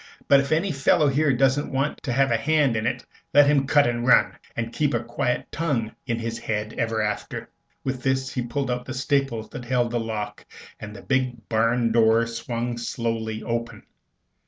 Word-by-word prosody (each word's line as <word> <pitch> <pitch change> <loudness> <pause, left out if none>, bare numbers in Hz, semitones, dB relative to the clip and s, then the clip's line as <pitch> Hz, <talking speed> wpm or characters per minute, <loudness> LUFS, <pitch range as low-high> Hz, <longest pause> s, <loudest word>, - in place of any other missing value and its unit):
But 140 - +7
if 140 0 -2
any 170 +5 +2
fellow 145 +1 +3
here 145 +2 +2
doesn't 135 +3 +2
want 135 +2 -1
to 130 - -3
have 135 +1 +2
a - - +4
hand 145 +1 +2
in 110 +1 0
it, - - -3 0.3
let 145 0 +8
him 140 -1 +3
cut 145 0 +5
and 120 0 -1
run, 130 - +5 0.2
and 115 0 -3
keep 145 -4 +1
a 120 - -1
quiet 125 +2 -2
tongue 140 -9 -1 0.2
in 115 -2 0
his 115 0 -4
head 105 0 -3
ever 110 -1 0
after." 105 0 -3 0.4
With 130 -1 -3
this 130 0 0
he 125 - -1
pulled 125 +2 -2
out 125 0 -3
the 130 - -6
staples 135 -4 -1
that 125 - -7
held 120 -1 +1
the 120 - 0
lock, 105 -2 -4 0.4
and 105 0 -8
the - - -11
big 125 -4 -1
barn 115 +1 +2
door 115 0 +4
swung 120 +1 -4
slowly 115 -2 -3
open. 115 0 -4
120 Hz, 195 wpm, -24 LUFS, 115-135 Hz, 0.4 s, let